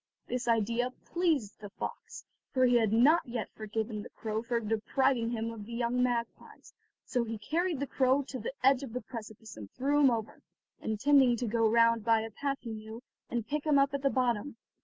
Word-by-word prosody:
This 245 0 -3
idea 230 +2 +1 0.2
pleased 315 - 0
the 205 -1 -8
fox, 200 - -7 0.3
for 255 -1 +3
he 245 -1 +4
had 220 -3 +2
not 280 +10 +5
yet 235 -2 -4
forgiven 215 0 -4
the - - -10
crow 220 -1 -4
for 235 0 -1
depriving 230 +3 +1
him 230 -1 -2
of 215 -2 -9
the 235 - -8
young 240 +1 0
magpies, 240 -2 -3 0.3
so 245 -3 0
he 225 -1 -4
carried 325 - -1
the 280 - -1
crow 265 +1 +2
to 260 -1 -7
the 230 - -5
edge 270 0 +5
of 265 -5 -7
the 250 - -3
precipice 220 -2 -9
and 105 -2 -9
threw 285 +3 +1
him 280 -2 +6
over, 225 -3 -3 0.4
intending 245 +3 +3
to 245 - -2
go 225 0 +2
round 230 0 +4
by 225 0 +3
a 225 0 -6
path 275 +5 -2
he 230 - -6
knew 220 +2 -8 0.3
and 235 -2 -3
pick 295 +3 -2
him 300 -2 +3
up 275 0 +3
at 280 - -2
the 275 - +2
bottom. 250 -1 0
235 Hz, 205 wpm, -30 LUFS, 220-265 Hz, 0.4 s, him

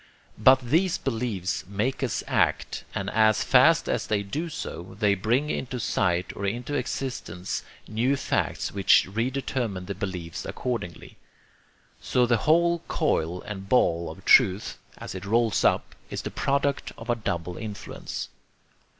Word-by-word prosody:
But 130 +4 +6
these 165 +9 +2
beliefs 110 -8 -2
make 105 +8 -1
us 130 -5 -1
act, - - 0
and 100 - -2
as 110 -1 +4
fast 155 +6 +5
as - - -1
they 105 -1 0
do 150 +12 -3
so, 95 - -7
they 105 -3 +4
bring 120 +10 +1
into 125 -1 -3
sight 90 -5 0
or 100 - -6
into 120 +7 -3
existence 125 -9 -3 0.3
new 120 +6 +1
facts - - -1
which 95 -3 +5
re 115 +6 -1
determine 120 -8 -3
the 100 - -4
beliefs 90 -5 -5
accordingly. 105 -10 -5 0.8
So 125 -1 +2
the 120 -1 +3
whole 170 +1 +4
coil 85 +3 0
and 100 -1 -7
ball 85 -9 +3
of 80 - -11
truth, 95 +2 +4 0.2
as - - -7
it 95 - -6
rolls 115 +1 +2
up, - - +2 0.2
is - - -4
the - - -4
product 140 0 0
of 115 - -10
a 120 - +2
double 90 -6 -3
influence. 105 -3 -6
110 Hz, 150 wpm, -26 LUFS, 95-130 Hz, 0.8 s, But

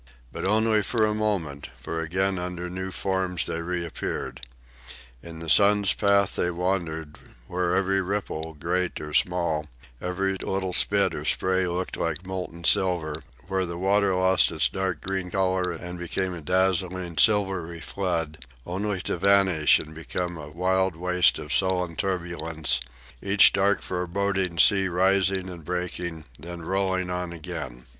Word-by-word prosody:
But - - -5
only 110 +2 +3
for 110 +2 +1
a 105 - +1
moment, 95 -10 -2
for 80 - -5
again 95 +4 0
under 90 0 -4
new 95 +1 -4
forms 95 -2 -1
they 80 - -3
reappeared. 85 -6 -4 0.8
In 85 -1 -9
the 80 0 -7
sun's 100 +3 +6
path 100 -1 +2
they 90 - +1
wandered, 85 -4 -2 0.3
where 90 +3 -1
every 95 0 +2
ripple, 90 -5 -3
great 90 +4 -1
or 75 0 -7
small, 85 -4 +1 0.3
every 95 +2 -1
little 95 -1 -2
spit - - +3
or - - -5
spray 95 0 +1
looked 90 +1 -3
like 90 - -2
molten 90 -2 -5
silver, 80 -4 +2 0.3
where 95 0 0
the 85 -1 -4
water 100 +1 +2
lost 95 0 +3
its - - +2
dark 95 -5 -3
green 95 -1 -3
color 95 -1 0
and 90 +1 -7
became 90 +2 -2
a 85 - -7
dazzling, 90 0 0
silvery 95 -6 +2
flood, 80 -5 -3 0.2
only 95 +2 -2
to - - -2
vanish 95 -5 +5
and 80 0 -8
become 85 +2 -4
a 75 -3 -8
wild 95 +2 +1
waste 90 0 +3
of 75 - -3
sullen 90 -3 +2
turbulence, 80 -8 -1 0.4
each 100 +1 +6
dark 100 0 +2
foreboding 90 0 -1
sea 95 +2 +5
rising 95 +1 +2
and 85 -3 -8
breaking, 85 -1 -4
then 85 0 -8
rolling 95 0 0
on 90 -1 -3
again. 65 -7 -7
90 Hz, 150 wpm, -26 LUFS, 85-95 Hz, 0.8 s, sun's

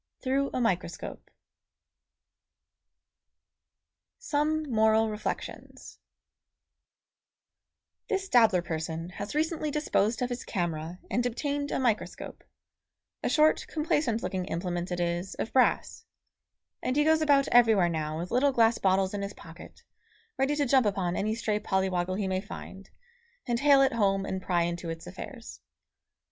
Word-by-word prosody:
THROUGH 275 +1 +1
A - - 0
MICROSCOPE 180 -7 -3 2.9
SOME 310 +1 0
MORAL 220 -4 +3
REFLECTIONS 210 0 -6 2.1
This 390 -2 -1
dabbler 220 - +4
person 160 0 -4
has 200 +7 -7
recently 315 0 0
disposed 245 -6 0
of 250 - -1
his 245 - -4
camera 170 -3 -3
and 245 - +1
obtained 285 +4 -2
a - - -1
microscope 240 -5 -2 0.8
a - - -1
short, 310 0 +3
complacent 295 -7 0
looking 185 -1 -2
implement 175 0 -3
it 175 - -2
is, 175 +2 -2
of - - -4
brass 260 - +2 0.8
and 255 - -1
he 295 - +4
goes 315 +1 +3
about 285 -3 +4
everywhere 225 -7 +5
now 155 -2 -2
with 175 +2 -5
little 265 +4 +3
glass 230 -2 +3
bottles 190 0 +2
in 205 - -3
his 200 +1 -5
pocket, 165 +1 -13 0.5
ready 270 +2 +1
to 290 -1 +1
jump 260 -3 +4
upon 190 -3 -1
any 215 +2 -1
stray 215 -2 -1
polly 190 -2 0
woggle 180 +1 -1
he 200 -1 -2
may 185 0 -1
find, 195 -1 -10 0.6
and 240 -2 0
hale 280 -1 +6
it 265 - +2
home 195 -3 +1
and 190 -1 -3
pry 175 -2 +1
into 170 0 -3
its 165 0 -6
affairs. 230 +7 -9
215 Hz, 140 wpm, -28 LUFS, 180-270 Hz, 2.9 s, hale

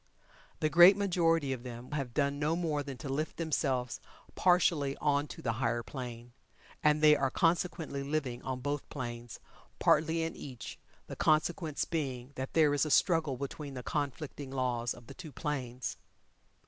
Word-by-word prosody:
The 155 - +2
great 175 +4 +9
majority 165 -7 +2
of 125 - -6
them 120 +1 -8
have 135 -5 -3
done 140 -1 +1
no 150 +2 +1
more 160 -4 -1
than 140 -2 -6
to 145 - -7
lift 150 +4 -2
themselves 135 -6 -1 0.3
partially 170 -6 +3
on 145 0 +1
to - - -10
the 115 - +1
higher 120 -1 0
plane, 120 -2 -7 0.5
and 150 0 +3
they 150 0 +8
are 135 -2 +1
consequently 165 -2 0
living 140 -4 -2
on 130 -1 -4
both 145 +1 -3
planes, 120 -3 -6 0.4
partly 160 +2 +3
in 165 - -3
each, 130 -4 -8 0.3
the - - -7
consequence 155 0 +1
being 135 -5 -3
that 130 0 -5
there 155 -3 +4
is 145 - +2
a 155 - -1
struggle 155 -3 +3
between 140 +1 -6
the 125 - -6
conflicting 145 0 -3
laws 125 -3 -1
of 120 - -14
the - - -10
two 170 -4 -10
planes. 130 -4 -4
145 Hz, 165 wpm, -32 LUFS, 130-155 Hz, 0.5 s, great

